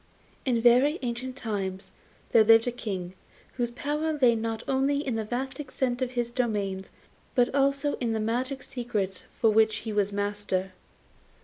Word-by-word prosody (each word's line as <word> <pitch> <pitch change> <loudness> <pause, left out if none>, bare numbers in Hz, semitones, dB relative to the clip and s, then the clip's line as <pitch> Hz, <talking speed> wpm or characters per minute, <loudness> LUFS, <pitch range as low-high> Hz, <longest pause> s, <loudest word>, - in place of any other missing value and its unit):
In 245 -3 +2
very 255 +6 +5
ancient 250 +1 -3
times 195 -6 -4 0.4
there 225 - +7
lived 225 +1 +6
a - - +1
King, 190 -7 -5 0.4
whose 240 -2 -1
power 300 +5 -2
lay 245 -3 +6
not 225 0 -3
only 275 +2 +1
in 260 - -1
the 220 - -1
vast 260 +5 -4
extent 260 -3 -2
of 255 -1 -1
his 240 -1 -1
dominions, 205 -6 -1 0.5
but 245 0 +3
also 275 +1 +1
in 235 -2 -1
the 220 - -1
magic 255 +5 -2
secrets 210 -7 -3 0.2
of 220 -1 +5
which 220 0 +4
he 220 - -3
was 205 -1 +1
master. 205 -2 -2
235 Hz, 165 wpm, -27 LUFS, 210-260 Hz, 0.5 s, there